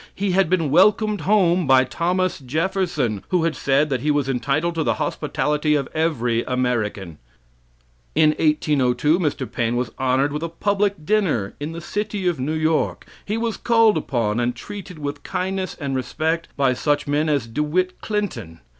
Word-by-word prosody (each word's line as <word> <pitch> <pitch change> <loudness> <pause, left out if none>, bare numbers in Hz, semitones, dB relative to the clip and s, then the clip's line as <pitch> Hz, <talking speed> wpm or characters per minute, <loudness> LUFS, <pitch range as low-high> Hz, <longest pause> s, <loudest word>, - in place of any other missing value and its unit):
He 195 -1 -1
had 185 -2 +2
been 165 -6 +1
welcomed 210 +4 +4
home 185 -5 +3
by 130 -1 +6
Thomas 180 +7 -1
Jefferson, 155 - -1
who 180 -3 +1
had 165 -1 0
said 140 +2 +1
that 130 - 0
he 150 - -1
was 145 -2 +1
entitled 140 +6 0
to 165 -1 -1
the - - +1
hospitality 150 0 0
of 140 -2 -1
every 125 -8 0
American. 110 -9 -2 1.0
In 155 - +5
1802 150 -1 +2
Mr. 145 -6 -2
Paine 115 0 -1
was 125 -2 -2
honored 130 +2 +1
with 150 - -3
a 165 - -3
public 200 -1 -1
dinner 160 - +1
in 150 +3 -4
the 170 - -7
City 205 +2 -3
of 175 -5 0
New 140 +5 -1
York. 155 0 0 0.2
He 210 +2 -2
was 230 -1 -2
called 225 -2 +4
upon 115 -4 -1
and 120 0 0
treated 195 +5 -9
with 145 -1 -5
kindness 190 0 -3
and 140 -3 -3
respect 160 +6 -1
by 135 -2 +3
such 145 +3 0
men 150 +2 0
as 140 -6 +1
De 115 +6 -3
Witt 180 +5 -1
Clinton. 205 - -3
155 Hz, 170 wpm, -22 LUFS, 130-185 Hz, 1.0 s, by